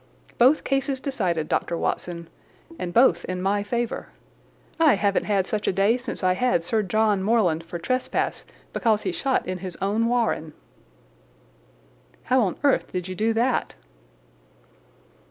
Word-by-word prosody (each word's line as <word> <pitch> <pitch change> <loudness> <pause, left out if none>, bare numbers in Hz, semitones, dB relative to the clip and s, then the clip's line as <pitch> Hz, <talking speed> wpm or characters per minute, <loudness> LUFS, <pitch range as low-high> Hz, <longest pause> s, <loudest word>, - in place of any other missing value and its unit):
Both 260 +6 +5
cases 270 0 -1
decided, 185 - -1
Dr. 170 - -1
Watson, 170 -1 -3 0.5
and 175 - -3
both 180 -6 +4
in 185 0 -4
my 200 +2 +1
favour. 235 +3 -3 0.7
I 310 -7 +5
haven't 200 0 +1
had 200 -3 +1
such 210 +1 -3
a - - +4
day 195 +4 +3
since 250 -5 -4
I 185 0 +4
had 195 -3 +1
Sir 220 +5 0
John 210 0 +1
Morland 190 -6 +2
for 170 +1 -6
trespass 255 +9 -1 0.3
because 220 -3 +1
he - - -1
shot 275 -6 -1
in 185 0 -3
his 185 -2 -6
own 210 +4 0
warren." 230 -10 0 1.7
"How 255 +1 +3
on 190 -5 -1
earth 280 -2 +2
did 180 -1 -3
you - - -3
do 220 +4 0
that?" 240 +3 0
210 Hz, 150 wpm, -24 LUFS, 185-245 Hz, 1.7 s, Both